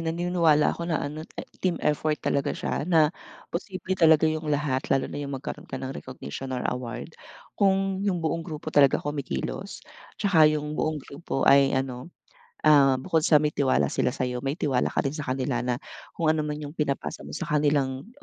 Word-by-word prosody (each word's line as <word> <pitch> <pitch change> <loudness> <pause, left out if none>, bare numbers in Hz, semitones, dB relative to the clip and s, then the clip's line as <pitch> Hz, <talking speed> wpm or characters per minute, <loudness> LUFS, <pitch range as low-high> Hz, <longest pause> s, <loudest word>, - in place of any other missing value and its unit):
naniniwala 165 -2 +2
ako 170 +1 -5
na 160 - +1
ano 150 +2 -6 0.4
team 180 -2 +1
effort 150 0 +1
talaga 140 - 0
siya - - -2
na 160 -1 +3 0.4
posible 190 +1 -3
talaga 160 -3 +5
yung 155 -1 -1
lahat 145 -3 0
lalo 135 -1 +2
na 145 - -5
yung 140 -1 -4
magkaroon 130 - -7
ka 130 - -4
ng 130 +1 -5
recognition 75 - -7
or 125 -1 -2
award. 125 +5 -5 0.4
Kung 195 -1 +1
yung 195 -3 0
buong 165 0 -1
grupo 155 -1 -6
talaga 140 -2 +5
kumikilos, 140 - -4 0.4
tsaka 160 -7 +5
yung 150 0 -2
buong 155 0 -1
grupo 140 0 -4
ay 140 0 +6
ano 130 +3 -3 0.5
ah, 140 -3 +6
bukod 150 +5 0
sa 155 0 +5
may 150 0 +2
tiwala 130 - +1
sila - - +1
sa'yo, 125 -1 -2
may 135 +4 -2
tiwala 130 -6 +1
ka - - -1
din 135 - -1
sa 155 - -5
kanila 130 0 -1
na 125 0 -1 0.4
kung 155 -2 +3
anuman 150 -1 -2
yung 145 -1 -7
pinapasa 150 -3 -2
mo - - -10
sa 170 - -3
kanilang, 145 -1 0
150 Hz, 180 wpm, -26 LUFS, 135-160 Hz, 0.5 s, ay